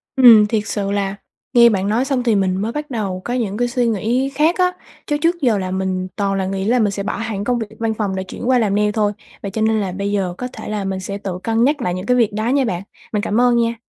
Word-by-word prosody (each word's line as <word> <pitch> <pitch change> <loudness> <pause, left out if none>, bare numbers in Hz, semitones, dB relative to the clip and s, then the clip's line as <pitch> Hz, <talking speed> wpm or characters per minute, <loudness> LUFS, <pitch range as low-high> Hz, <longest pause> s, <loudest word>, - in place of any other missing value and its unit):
Ừm, 235 -5 +8
thiệt 215 -1 -1
sự 200 -2 -2
là 200 -1 -1 0.4
nghe 235 -1 +7
bạn 195 -2 0
nói 230 +5 +1
xong 265 -3 0
thì 230 -3 +2
mình 190 -1 +1
mới 225 +2 -1
bắt 300 +2 -5
đầu 195 -6 -3
có 245 - -2
những 215 -5 -1
cái 245 +1 +1
suy 245 -1 0
nghĩ 230 +5 0
khác 315 +4 +3
á, 365 -1 +3 0.4
chứ 295 - +1
trước 340 +2 0
giờ 240 -6 +3
là 185 -1 -3
mình 185 -1 -2
toàn 200 -2 0
là 195 -1 -1
nghĩ 190 0 -2
là 245 +4 +3
mình 210 -3 +2
sẽ 200 0 -4
bỏ 205 - -3
hẳn 220 -3 -3
công 240 +3 0
việc 220 - -4
văn 225 -1 0
phòng 205 -3 -2
để 190 - -2
chuyển 235 +6 -5
qua 255 -1 +4
làm 205 -3 +1
nail 210 0 +2
thôi, 210 -1 +1 0.3
vậy 200 - -5
cho 220 - -3
nên 220 0 +2
là 190 -2 -2
bây 200 +2 -3
giờ 190 -3 -1
có 250 - -4
thể - - -8
là 210 -2 -2
mình 190 -1 -3
sẽ 200 +1 -5
tự 190 -3 -5
cân 225 0 +1
nhắc 290 +2 +2
lại 180 -6 -1
những 185 +2 -5
cái 250 0 +2
việc 225 -4 +2
đó 215 +2 -2
nha 275 0 +2
bạn. 180 -4 -3 0.3
Mình 210 - +1
cảm 215 +4 +1
ơn 245 -1 +4
nha. 230 0 +1
215 Hz, 295 wpm, -19 LUFS, 195-240 Hz, 0.4 s, Ừm